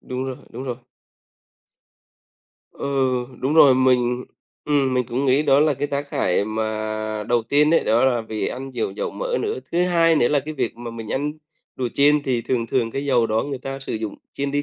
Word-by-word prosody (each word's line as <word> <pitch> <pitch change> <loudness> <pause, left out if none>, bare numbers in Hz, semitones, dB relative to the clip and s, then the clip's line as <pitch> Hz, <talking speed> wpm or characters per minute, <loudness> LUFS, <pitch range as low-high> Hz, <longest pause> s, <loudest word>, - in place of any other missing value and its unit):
Đúng 130 +1 -5
rồi, 130 -1 -4
đúng 130 - -7
rồi. 125 -2 -4 2.0
Ừ, - - -6 0.5
đúng 140 +4 0
rồi, 140 -5 +7
mình 125 -1 +2 0.4
ừm, 140 -3 +1
mình 125 -2 +1
cũng 130 +4 -2
nghĩ 135 +3 +4
đó 140 -1 +4
là 150 -2 +3
cái 145 +3 -2
tác 140 0 -3
hại 90 +2 +1
mà 110 0 -3
đầu 120 -1 +2
tiên 145 +6 +3
ấy, - - +3
đó 115 +4 +3
là 125 -3 +2
vì 110 -1 -2
ăn 135 +2 -6
nhiều 115 -5 -2
dầu 100 - -4
mỡ - - -2
nữa. 425 +1 -2
Thứ 175 +1 +2
hai 165 -2 +3
nữa 120 - +3
là 145 -2 +2
cái 155 +3 -7
việc 125 -4 -2
mà 120 -1 -7
mình 115 -2 -6
ăn 145 +2 -1 0.4
đồ 125 -2 -1
chiên 145 +1 +4
thì 125 -4 0
thường 115 -2 -1
thường 115 -1 0
cái 135 +3 -4
dầu 125 -5 +2
đó 110 +1 0
người 140 -2 -4
ta 135 +1 -6
sử 135 - -6
dụng 110 -1 -4 0.2
chiên 140 0 -3
đi 145 +1 0
130 Hz, 215 wpm, -22 LUFS, 115-145 Hz, 2.0 s, rồi